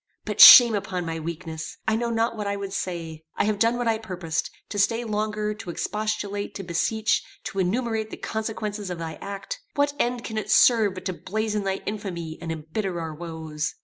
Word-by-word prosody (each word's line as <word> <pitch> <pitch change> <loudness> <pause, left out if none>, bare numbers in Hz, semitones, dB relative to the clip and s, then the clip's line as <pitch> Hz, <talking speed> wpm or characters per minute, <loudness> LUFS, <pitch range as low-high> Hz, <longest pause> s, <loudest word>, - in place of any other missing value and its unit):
But - - +1
shame 240 -2 +12
upon 185 -3 -2
my 165 0 -3
weakness. 160 -1 -6
I 220 - +3
know 235 +1 -1
not 230 0 0
what 210 -2 -4
I 200 - -1
would 200 -1 -5
say. 165 -5 -4
I - - +1
have 210 -1 0
done 230 +2 +3
what 245 -1 -1
I 225 -1 +1
purposed. 180 -7 -3 0.2
To 205 - -3
stay 230 +4 +2
longer, 215 -1 -2
to 210 -4 -9
expostulate, 205 +2 -3
to 195 - -5
beseech, 220 +6 0 0.2
to 195 - -4
enumerate 220 +3 0
the - - -8
consequences 215 -2 -4
of 180 - -4
thy 165 -1 -6
act 200 - -6 0.2
what 285 0 +2
end 245 0 0
can 220 -1 -3
it - - -7
serve 220 -5 +5
but 185 - -8
to 185 - -1
blazon 210 +2 -2
thy 190 0 -1
infamy 175 -6 -5
and 165 -1 -4
embitter 170 +4 -3
our 160 -1 -4
woes? 160 -1 -5
205 Hz, 200 wpm, -25 LUFS, 170-220 Hz, 0.2 s, shame